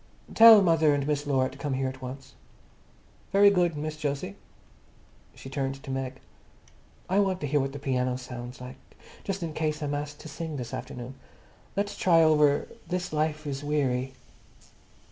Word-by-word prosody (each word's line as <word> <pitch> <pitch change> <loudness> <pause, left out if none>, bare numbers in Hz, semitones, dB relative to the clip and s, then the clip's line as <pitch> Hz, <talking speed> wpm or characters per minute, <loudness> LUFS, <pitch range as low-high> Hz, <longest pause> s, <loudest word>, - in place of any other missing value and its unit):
"Tell 225 -3 +9
mother 160 -4 +4
and 140 -1 -1
Miss 145 0 -1
Laura 130 -2 +2
to 135 - -13
come 140 -2 -2
here 135 0 -1
at 130 +1 -7
once." 130 +1 -8 1.0
"Very 200 +1 +6
good, 175 -5 +1
Miss 155 0 -5
Jose." 140 -9 -3 1.0
She - - -11
turned 135 0 -2
to 135 - -6
Meg. 135 0 -4 0.9
"I 190 +3 +2
want 190 -2 +1
to - - -2
hear 145 +1 +1
what 135 0 -1
the 145 - -7
piano 125 -2 -1
sounds 125 -1 -8
like, 125 +1 -9 0.5
just 195 -2 -3
in 160 -2 -4
case 155 -1 -2
I'm 145 0 -2
asked 145 0 -4
to - - -9
sing 155 0 -5
this 120 -2 -6
afternoon. 125 +1 -6 0.6
Let's 205 0 -1
try 165 -3 +4
over 150 -2 +4 0.2
'This 180 -1 -3
life 155 0 -1
is 140 -1 -4
Weary. 135 -3 0
145 Hz, 170 wpm, -27 LUFS, 135-160 Hz, 1.0 s, Tell